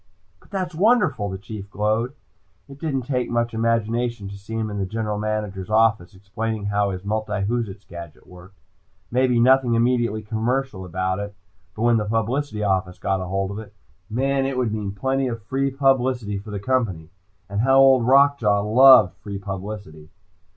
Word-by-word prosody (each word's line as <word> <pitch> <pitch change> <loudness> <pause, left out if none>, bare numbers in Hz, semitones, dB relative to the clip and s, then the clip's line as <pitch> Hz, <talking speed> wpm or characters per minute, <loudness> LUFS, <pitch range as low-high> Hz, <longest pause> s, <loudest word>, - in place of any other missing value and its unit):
"But - - -24
that's 185 -3 -3
wonderful," 180 - +2
the 95 - -5
Chief 100 0 -9
glowed. 110 +5 -1 0.5
It 140 0 -13
didn't 140 -5 -2
take 125 -1 -2
much 120 0 0
imagination 115 -1 -1
to 100 - -8
see 100 +3 -8
him 110 -1 -2
in 105 - -4
the 95 - -1
General 105 0 -3
Manager's 105 -3 -3
office 110 -3 +2
explaining 105 +3 -4
how 100 0 +1
his 95 -1 -5
multiwhoozits 105 0 -2
gadget 85 -3 -10
worked. 90 +2 -15 0.5
Maybe 125 -1 +2
nothing 125 -1 +4
immediately 115 -2 +1
commercial 110 -1 -2
about 95 +2 -2
it, 100 0 -6 0.4
but 110 - -3
when 120 -1 +4
the 105 - -1
publicity 115 +2 -1
office 95 -2 0
got 95 -1 -1
hold 95 +1 -2
of 100 - -5
it 105 -1 -11 0.3
man, 135 +4 0
it 135 -1 -3
would 120 -4 0
mean 105 -2 -3
plenty 130 +6 -1
of 115 -3 -5
free 135 +6 -1
publicity 130 -6 +1
for 105 +2 -11
the 105 -1 -4
Company. 100 -9 -1 0.4
And 100 +1 -2
how 135 +2 +4
Old 135 -2 +6
Rock 140 +2 +5
Jaw 105 -2 +2
loved 110 -2 +7
free 100 +3 -7
publicity! 95 -5 -7
110 Hz, 170 wpm, -23 LUFS, 100-125 Hz, 0.5 s, loved